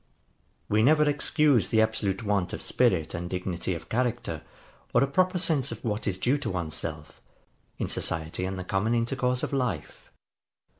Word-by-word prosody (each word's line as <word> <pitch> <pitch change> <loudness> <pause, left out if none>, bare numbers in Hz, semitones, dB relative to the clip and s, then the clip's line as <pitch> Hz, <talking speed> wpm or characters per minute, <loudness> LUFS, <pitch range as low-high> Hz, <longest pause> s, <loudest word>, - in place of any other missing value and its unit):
] 65 -1 -41
We 110 - +5
never 150 +5 +5
excuse 145 -3 +3
the 110 - +3
absolute 105 -2 -1
want 100 -4 0
of - - -5
spirit 95 -11 +2
and 85 -1 -4
dignity 90 0 -2
of 80 - -8
character, 120 -9 -1 0.5
or - - +6
a - - +2
proper 185 +6 +2
sense 155 -6 +1
of - - -7
what 105 -1 -1
is 95 -2 0
due 130 +8 +1
to 145 - -3
one's 85 -4 -3
self, 75 -1 -5 0.6
in - - -2
society 80 +2 -2
and 95 0 -3
the 95 - -4
common 95 +6 0
intercourse 125 +1 0
of - - -2
life. 125 - -3
110 Hz, 180 wpm, -27 LUFS, 90-130 Hz, 0.6 s, or